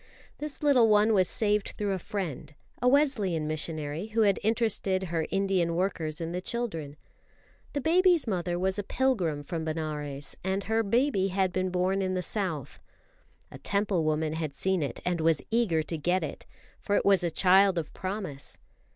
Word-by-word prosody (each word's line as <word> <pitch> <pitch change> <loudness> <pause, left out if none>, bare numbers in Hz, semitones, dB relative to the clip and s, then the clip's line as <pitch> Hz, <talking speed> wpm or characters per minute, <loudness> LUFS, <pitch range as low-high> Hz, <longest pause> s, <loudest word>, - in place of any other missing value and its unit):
This 300 0 -6
little 265 -6 +5
one 210 +1 +4
was 185 -3 +3
saved 210 -2 0
through 205 -1 -1
a 190 - -1
friend, 160 -7 -5 0.3
a 250 - +2
Wesleyan 250 - +2
missionary, 155 +2 -3
who 220 +1 0
had 200 -3 +3
interested 215 -4 0
her 165 -3 -2
Indian 190 -4 +1
workers 165 -4 -1
in 165 0 -4
the 180 +1 -3
children. 175 -11 -4 0.8
The 285 - -1
baby's 350 +1 +4
mother 180 -5 -1
was 190 +2 0
a - - -2
pilgrim 190 - 0
from 160 +2 -4
Benares, 150 -3 -4
and 190 +1 -1
her 225 +2 +1
baby 225 -2 +2
had 190 -1 0
been 185 0 0
born 185 +2 0
in 185 -1 -1
the 180 - -1
South. 180 - -2 0.7
A - - -10
Temple 200 -4 0
woman 155 0 0
had 155 -3 -4
seen 190 +4 0
it 140 - -3
and 175 -2 0
was 160 -2 +2
eager 210 -9 +2
to 165 +1 -4
get 180 +4 +1
it, - - -6 0.3
for 205 - -1
it - - +1
was 195 -2 +5
a 170 - +1
child 190 +2 +4
of 160 -3 -3
promise. 185 -7 -5
185 Hz, 175 wpm, -28 LUFS, 160-210 Hz, 0.8 s, little